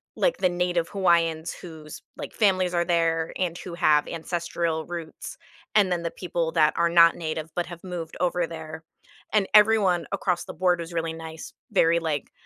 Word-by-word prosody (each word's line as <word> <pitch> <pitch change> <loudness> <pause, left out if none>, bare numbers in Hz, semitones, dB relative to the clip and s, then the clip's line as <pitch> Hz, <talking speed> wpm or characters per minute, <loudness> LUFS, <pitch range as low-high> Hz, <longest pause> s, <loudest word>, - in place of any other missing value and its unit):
like, - - +1
the 185 - +2
native 175 -1 -1
Hawaiians 170 -4 +1
whose, 160 -4 -10 0.2
like, - - -7
families 185 -4 +2
are 170 0 +1
there 165 -1 +1
and 175 -2 -1
who 180 - -8
have 150 -3 +3
ancestral 165 -1 -3
roots, 170 -2 -7 0.4
and 200 -3 +4
then 175 -1 0
the 170 - -2
people 170 -2 -3
that 155 -2 +4
are 170 0 +3
not 170 -1 +6
native 155 -1 -4
but 175 - 0
have 175 0 -10
moved 175 -3 -6
over 175 -1 0
there, 160 0 -8 0.5
and 205 -3 +3
everyone 205 -6 +5
across 180 -3 -1
the - - -8
board 180 +1 +1
was 170 +1 -7
really 165 -1 -2
nice, 160 0 -9 0.2
very, 165 +1 +3
like, 155 -4 -3
170 Hz, 180 wpm, -25 LUFS, 160-180 Hz, 0.5 s, not